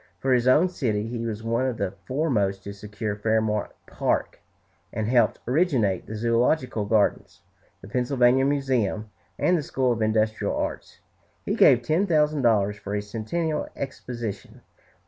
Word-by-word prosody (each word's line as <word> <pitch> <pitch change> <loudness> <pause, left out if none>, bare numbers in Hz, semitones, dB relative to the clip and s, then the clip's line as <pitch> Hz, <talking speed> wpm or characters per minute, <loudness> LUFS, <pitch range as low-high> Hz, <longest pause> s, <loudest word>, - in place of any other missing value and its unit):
For 130 -1 +1
his 125 0 +2
own 150 +8 +5
city 115 - -2
he 115 0 -4
was 110 -1 -4
one 115 +3 0
of 125 -3 -3
the 100 -2 -2 0.2
foremost 110 -9 0
to 100 - -7
secure 105 +1 -5
Fairmount 110 0 0 0.2
Park, - - -1 0.5
and 110 -1 -2
helped 120 -2 +3
originate 125 - +1
the - - -6
Zoölogical 115 0 +1
Gardens, 110 -3 +1 0.4
the - - -11
Pennsylvania 125 +2 +2
Museum, 130 -7 0 0.3
and 180 - +2
the 165 - 0
School 130 -3 0
of 115 -1 -1
Industrial 110 0 +1
Arts. - - -5 0.4
He - - -1
gave 120 - +5
ten 165 +10 +1
thousand 150 -3 +2
dollars 105 -4 +2
for 100 0 -5
a 105 - -1
Centennial 120 +10 -2
Exposition. 120 -6 -6
115 Hz, 150 wpm, -25 LUFS, 105-130 Hz, 0.5 s, own